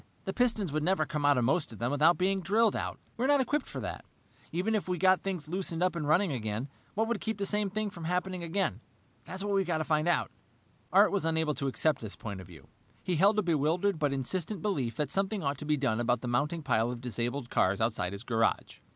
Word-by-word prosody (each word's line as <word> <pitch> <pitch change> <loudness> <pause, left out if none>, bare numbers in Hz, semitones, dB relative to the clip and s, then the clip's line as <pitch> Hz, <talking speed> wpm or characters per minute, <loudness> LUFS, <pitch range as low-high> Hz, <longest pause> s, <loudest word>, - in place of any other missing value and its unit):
"The 190 - -2
pistons 225 - +1
would 155 +1 0
never 170 -1 +2
come 150 -1 -1
out 145 -2 +5
of 125 - +2
most 140 +5 +1
of 110 - -10
them 120 +4 -1
without 155 +4 +4
being 190 +1 +1
drilled 215 +4 +3
out. - - -3 0.2
We're 250 +3 +1
not 285 0 +5
equipped 285 +2 0
for - - -6
that. - - -5 0.5
Even 185 +6 0
if 215 -4 0
we 180 -1 -1
got 185 +2 +4
things 180 -6 -3
loosened 175 0 -2
up 185 -1 +1
and 155 -4 -2
running 175 +4 +3
again, 115 +1 -3 0.3
what 220 +2 +1
would 235 -2 -1
keep 220 -1 -2
the 200 - -1
same 210 0 0
thing 215 +1 -2
from 170 -4 -8
happening 180 +1 -1
again? 170 - -1 0.4
That's 190 +5 -4
what 205 0 -1
we've 195 -1 +3
got 170 -3 +1
to 155 - -1
find 155 +1 +1
out." 175 - +1 0.6
Art - - +6
was 200 -4 0
unable 160 -1 +1
to 140 - -2
accept 145 +2 +1
this 110 -3 -6
point 100 -4 -6
of 95 - -12
view. 75 -6 -14 0.4
He 180 -3 0
held 200 +5 +4
a 210 - +3
bewildered 170 +3 +1
but 145 -3 +1
insistent 170 - -2
belief 135 - -1
that 145 0 -2
something 195 0 0
ought 140 -1 -1
to - - -5
be 150 0 +2
done 125 -5 0
about 120 0 +1
the 125 - -4
mounting 150 +7 0
pile 115 -3 +2
of 125 -1 -4
disabled 120 +1 -3
cars 95 +1 +2
outside 110 -6 0
his 100 +2 -6
garage. 115 -2 0
160 Hz, 245 wpm, -30 LUFS, 130-195 Hz, 0.6 s, Art